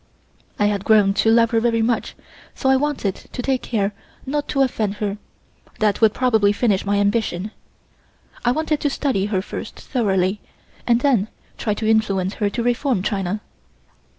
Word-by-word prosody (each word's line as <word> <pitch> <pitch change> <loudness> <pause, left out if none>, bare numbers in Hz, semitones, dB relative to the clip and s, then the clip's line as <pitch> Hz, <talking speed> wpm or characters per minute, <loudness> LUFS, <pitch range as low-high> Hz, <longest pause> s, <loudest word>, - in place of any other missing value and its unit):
I 205 - +2
had 205 -2 0
grown 205 -3 +4
to 225 - +3
love 230 0 +4
her 230 - +3
very 230 -1 +1
much, 230 -1 -1 0.4
so 265 - 0
I - - +5
wanted 265 -8 0 0.2
to - - -4
take 265 -1 0
care 210 -3 -1 0.3
not 290 +2 -2
to 275 -1 +2
offend 215 -6 -1
her; 205 -1 -3 0.6
that 210 -1 +1
would 220 -1 +6
probably 220 -4 +2
finish 205 -2 +1
my 200 0 +2
ambition. 205 -1 0 0.9
I 240 - +3
wanted 310 +2 0
to 290 - 0
study 260 -8 0
her 190 -3 -1
first - - -7
thoroughly 195 -5 0 0.5
and 240 0 +3
then 245 -8 +2 0.3
try 210 -2 -1
to 215 - -3
influence 200 -4 +1
her 205 - +2
to 235 +3 -3
reform 245 -3 0
China. 200 0 -2
220 Hz, 170 wpm, -21 LUFS, 200-245 Hz, 0.9 s, would